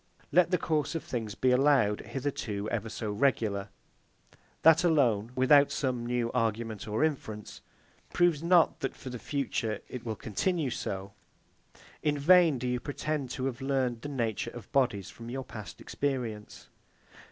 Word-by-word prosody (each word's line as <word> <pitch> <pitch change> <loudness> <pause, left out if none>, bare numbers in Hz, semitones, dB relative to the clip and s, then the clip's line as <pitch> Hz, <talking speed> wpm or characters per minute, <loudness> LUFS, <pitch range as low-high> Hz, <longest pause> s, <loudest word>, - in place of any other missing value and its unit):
Let 170 +2 +5
the 180 - +2
course 155 -2 -1
of 165 - -2
things 110 -4 -4
be 130 - +2
allowed 125 -6 +3
hitherto 115 -4 -4
ever 115 -1 -2
so 110 -1 -4
regular; 105 -4 0 0.9
that 165 +2 +7
alone, 125 - +2
without 140 +2 +6
some 125 -4 -1
new 120 -1 0
argument 115 -3 -2
or 110 +6 0
inference, 110 -9 -3 0.5
proves 175 -4 +3
not 170 -1 +4
that, 135 - -3
for 130 - -8
the 125 - -6
future, 120 -6 -2
it 125 -2 -7
will 110 -2 -3
continue 145 - -1
so. 100 -2 -4 0.9
In 150 -1 +1
vain 165 0 +5
do 125 +1 -3
you 125 0 0
pretend 145 0 -3
to 130 0 -3
have 135 0 -3
learned 130 -4 0
the 145 - -5
nature 115 -4 -2
of 120 -3 -11
bodies 120 -9 +1
from 115 0 -10
your 135 +2 -4
past 110 -7 -9
experience. 120 -7 -4
125 Hz, 155 wpm, -29 LUFS, 110-145 Hz, 0.9 s, that